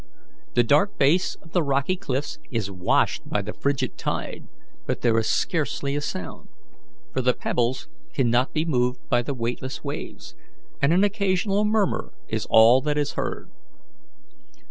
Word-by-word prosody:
The 120 - +5
dark 145 - +3
base 155 +7 +3
of 160 - -17
the 175 - +2
rocky 140 +4 +1
cliffs 145 -6 -3
is 110 -5 -2
washed 90 -2 +1
by 105 - 0
the 105 - -5
frigid 140 -1 -1
tide, - - -4 0.4
but - - -2
there 115 -2 +3
is 110 - -1
scarcely 140 -3 0
a 145 - -1
sound, 90 - -6 0.6
for - - 0
the 125 0 +2
pebbles 120 - -1 0.2
cannot 120 - +2
be 155 0 0
moved 125 -5 0
by 120 - +3
the 140 +3 -4
weightless 125 +2 -4
waves, - - -6 0.5
and 140 - +4
an 180 +4 +4
occasional 200 0 +1
murmur 210 - 0
is - - -3
all 115 +4 +7
that 150 0 -1
is 145 -1 0
heard. - - -4
140 Hz, 155 wpm, -24 LUFS, 120-165 Hz, 0.6 s, all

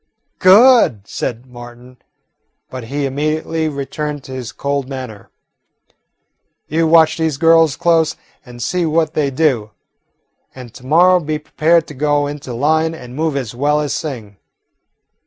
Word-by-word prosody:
"Good!" 195 - +5
said 120 +1 -5
Martin, 120 0 -13 0.7
but 130 -2 -7
he 140 +4 -3
immediately 155 +3 -2
returned 145 0 -5
to 135 - -12
his 130 -2 -6
cold 140 -1 -3
manner. 130 -6 -8 1.4
"You 160 +2 0
watch 160 0 +4
these 160 -4 -1
girls 165 -1 +4
close 165 -2 +1 0.3
and 120 -3 -9
see 180 +7 -1
what 160 0 0
they 145 -2 0
do, 130 -6 0 0.9
and 125 -3 -11
to 125 0 -13
morrow 180 +5 +5
be 155 -2 -3
prepared 160 +2 +1
to 150 - -11
go 145 +1 0
into 145 -3 -7
line 155 +6 0
and 125 -5 -11
move 155 -1 -1
as 125 -5 -4
well 145 +4 0
as 145 -2 -2
sing." 115 -11 -6
145 Hz, 140 wpm, -17 LUFS, 130-160 Hz, 1.4 s, Good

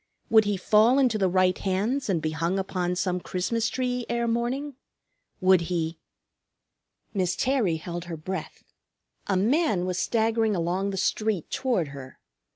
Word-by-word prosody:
Would 220 -1 +6
he 205 -1 0
fall 215 +7 +4
into 250 -6 +2
the 190 -2 +2
right 185 0 +3
hands 210 +8 -1
and 170 -5 0
be 155 - 0
hung 165 +4 -1
upon 180 -2 -1
some 180 0 -1
Christmas 220 +6 -1
tree 250 -1 -2
ere 235 0 0
morning? 245 +5 -1 0.7
Would 185 -2 +4
he 165 -2 -2 1.1
Miss 185 -3 0
Terry 245 -10 +1
held 170 +2 -6
her 170 -2 -6
breath. 185 +5 -6 0.6
A 195 - +1
man 220 - +2
was 185 -1 -2
staggering 225 -1 +1
along 180 +3 -1
the 195 - -4
street 210 -2 -1
toward 235 - 0
her. 135 -2 -10
190 Hz, 155 wpm, -26 LUFS, 180-230 Hz, 1.1 s, Would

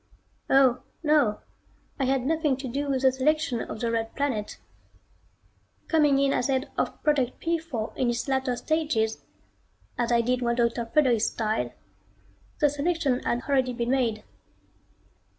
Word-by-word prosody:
Oh, 265 -2 +4 0.2
no, 295 -9 +2 0.6
I 270 - +1
had 260 -1 +1
nothing 305 -3 +1
to 265 0 -6
do 280 +4 -3
with 270 -1 0
the 265 - +6
selection 265 -2 0
of 215 - -6
the 235 -1 0
Red 225 -1 -2
Planet. 255 -7 -2 1.3
Coming 295 -4 +3
in 275 0 +2
as 245 - 0
head 265 0 -1
of - - -3
Project 275 -5 +1
P 335 0 0
4 255 -10 -5
in 250 - +1
its 240 +2 -2
latter 265 -2 0
stages, 275 -7 -1 0.8
as 240 0 0
I 235 0 +4
did 250 +2 0
when 235 -1 +1
Dr. 235 -1 0
Fredericks 240 -4 +3
died, 220 -1 -2 0.9
the 295 - +4
selection 290 -3 0
had 240 0 -2
already 260 -3 +1
been 240 0 -2
made. 230 -5 0
260 Hz, 150 wpm, -26 LUFS, 235-285 Hz, 1.3 s, the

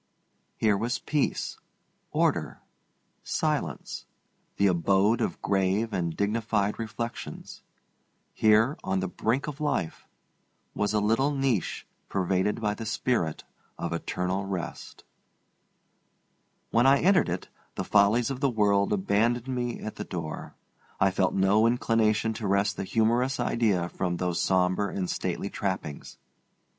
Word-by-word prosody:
Here 110 -2 +3
was 115 +5 -1
peace, 150 -2 -1 0.5
order, - - 0 0.6
silence, - - -2 0.5
the 100 - +3
abode 95 +4 +3
of - - -2
grave 100 +3 +1
and 85 -4 -2
dignified 105 0 0
reflections. 115 +1 -6 0.7
Here, 110 +6 +3
on 95 0 0
the 95 - -1
brink 115 +8 -1
of 150 0 -6
life, 145 - -2 0.7
was 105 +1 0
a - - +4
little 115 +7 +2
niche 135 - -1 0.2
pervaded 95 +2 0
by 105 -2 0
the 110 +1 -6
spirit 110 -7 -1 0.3
of 85 - -3
eternal 90 +3 -2
rest. 90 -3 -6 1.7
When 120 +3 +4
I 135 +1 +6
entered 185 - +4
it, 90 +2 -4 0.3
the - - -2
follies 105 +5 +3
of 130 - -4
the 140 -1 +2
world 100 -3 +2
abandoned 110 +5 +1
me 120 -2 -2
at 110 - -6
the - - -3
door. 80 -3 -6 0.4
I 95 - +4
felt 95 0 +1
no 100 +4 +4
inclination 115 -2 +2
to 110 -2 -4
wrest 100 +2 +1
a - - -1
humorous 120 +6 +1
idea 100 -7 +1
from 90 -2 -2
those 90 -1 -1
sombre 95 +1 +1
and 95 -2 -1
stately 95 +3 -3
trappings. 95 -7 -4
105 Hz, 130 wpm, -27 LUFS, 95-115 Hz, 1.7 s, I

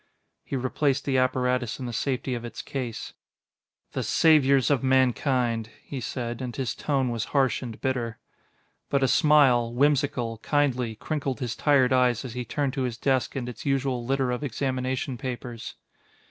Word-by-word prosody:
He - - -5
replaced 135 +2 0
the 130 -2 +2
apparatus 125 -1 0
in 130 - -4
the 120 - -4
safety 130 +2 -1
of 120 -1 -4
its 120 - -7
case. 125 -5 -5 0.8
"The - - -2
saviors 140 -4 +4
of 140 -4 +2
mankind!" 125 -3 +2
he 135 -3 -6
said, 120 +1 -4
and 125 -2 -5
his 130 -3 -2
tone 135 -4 0
was 115 -2 -2
harsh 135 -3 +2
and 120 -4 -7
bitter. 120 -4 -2 0.7
But 140 -1 +2
a - - +4
smile, 130 -3 +4
whimsical, 130 -4 +1
kindly, 125 -5 0
crinkled 140 +1 -3
his 120 -4 -3
tired 135 -4 +3
eyes 125 -1 +2
as 120 - -6
he 125 0 -3
turned 140 +2 -1
to 135 - -2
his 125 -3 -2
desk 130 +2 0
and 130 -3 -3
its 125 - -7
usual 135 -3 0
litter 130 0 0
of 125 +4 -3
examination 130 -1 -2
papers. 120 -2 -6
130 Hz, 165 wpm, -26 LUFS, 120-135 Hz, 0.8 s, saviors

